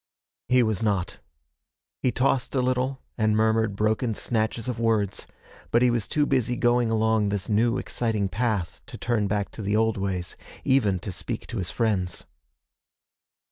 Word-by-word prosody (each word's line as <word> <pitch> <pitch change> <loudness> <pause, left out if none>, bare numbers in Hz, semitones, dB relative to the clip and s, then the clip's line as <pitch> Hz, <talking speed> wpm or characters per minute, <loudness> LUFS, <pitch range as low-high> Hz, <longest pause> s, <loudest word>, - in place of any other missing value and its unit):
He 125 0 +5
was 110 -4 0
not. 100 -5 -1 0.8
He 125 - +2
tossed 130 +1 0
a 130 - +3
little, 130 +1 -1 0.2
and 110 -1 +3
murmured 110 -1 +2
broken 110 +2 0
snatches 110 +1 -1
of 120 -2 -3
words, 110 -4 0 0.4
but 120 +1 +3
he 125 - +4
was 115 -3 -1
too 150 -1 +1
busy 125 -4 +1
going 120 -1 +2
along 110 -1 +2
this 100 -1 -2
new 115 +3 +2
exciting 110 -5 -1
path 105 -3 -2
to - - -9
turn 115 -4 0
back 100 0 -1
to - - -8
the 100 +1 0
old 110 0 +2
ways, 95 -3 -3 0.3
even 110 -8 +3
to 100 - -5
speak 90 - -5
to 120 - -5
his 90 -1 -2
friends. 100 -6 -1
110 Hz, 165 wpm, -26 LUFS, 105-120 Hz, 0.8 s, He